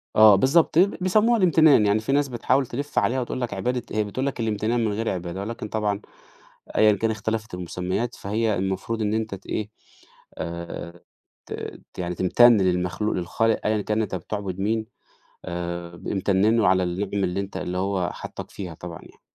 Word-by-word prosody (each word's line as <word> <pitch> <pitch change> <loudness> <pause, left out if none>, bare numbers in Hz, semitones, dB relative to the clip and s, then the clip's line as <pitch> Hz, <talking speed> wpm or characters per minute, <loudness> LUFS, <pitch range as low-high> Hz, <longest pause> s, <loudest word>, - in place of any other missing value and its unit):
آه 110 -1 +8
بالضبط 150 - +3
بيسموها 205 +5 +3
الامتنان، 160 - +5
يعني 105 +1 +3
في 110 +5 -3
ناس 145 +1 +3
بتحاول 130 +2 +1
تِلِف 140 +5 -2
عليها 130 +2 +1
وتقول 125 +1 -4
لك 120 - -2
عبادة 120 +5 -1
هي 110 - +1
بتقول 115 +6 -3
لك 140 -2 -3
الامتنان 115 +1 0
من 110 - 0
غير 110 +2 -1
عبادة، 90 0 -4
ولكن 110 +2 -5
طبعًا 105 -1 -1 0.8
أيًا 110 0 +6
كان 110 +3 0
اختَلَفِت 110 0 -3
المسميات 90 +6 -3
فهي 110 +2 -1
المفروض 95 +4 -2
إن 105 0 0
أنت 110 -2 -2
تإيه 105 +2 -4 0.7
آآ، 85 0 -6 0.5
ت - - -6 0.4
ت - - -11
يعني 90 0 -2
تمتن 120 +7 +6
للمخلوق 90 +2 0
للخالق 110 +6 +1
أيًا 110 -1 +2
كان 105 +2 0
أنت 105 -3 -2
بتعبد 95 +1 -4
مين، 110 +3 0 0.6
آآ 85 -1 -5
ب - - -9
امتن 100 +3 +2
له 110 -5 +4
على 95 0 +4
النِعَم 95 +3 -1
اللي 90 +2 -1
أنت 100 0 -6
اللي 90 +1 -3
هو 95 -2 0
حَطّك - - -8
فيها 90 -4 -7
طبعًا 85 +1 -8
يعني. - - -17
105 Hz, 175 wpm, -24 LUFS, 95-115 Hz, 0.8 s, آه